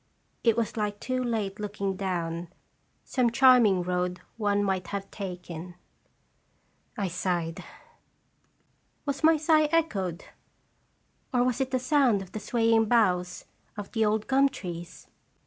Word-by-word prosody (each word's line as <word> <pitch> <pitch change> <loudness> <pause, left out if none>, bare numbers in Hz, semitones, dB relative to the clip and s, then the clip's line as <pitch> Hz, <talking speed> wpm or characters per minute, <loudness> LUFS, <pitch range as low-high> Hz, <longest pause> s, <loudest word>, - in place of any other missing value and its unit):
It 230 -1 +3
was 230 0 -1
like 205 -1 -2
too 255 0 -2
late 215 -4 -2
looking 200 -2 -3
down 175 -3 -3 0.6
some 250 -3 +1
charming 235 -7 +5
road 180 0 -1 0.2
one 205 -2 +1
might 190 -2 -1
have 195 -1 -5
taken. 180 -3 -7 1.2
I 200 - -1
sighed. 175 -2 -2 1.4
Was 280 +1 -3
my 320 0 +6
sigh 310 0 +4
echoed, 200 - 0 1.1
or 245 -2 +3
was 250 0 0
it 265 - 0
the 260 - +1
sound 255 -6 +2
of 185 - -15
the 215 - -5
swaying 225 0 +2
boughs 185 -6 +1 0.3
of 205 -1 -7
the 225 - +1
old 215 0 +1
gum 275 +1 +4
trees 175 -7 -8
205 Hz, 130 wpm, -27 LUFS, 180-245 Hz, 1.4 s, my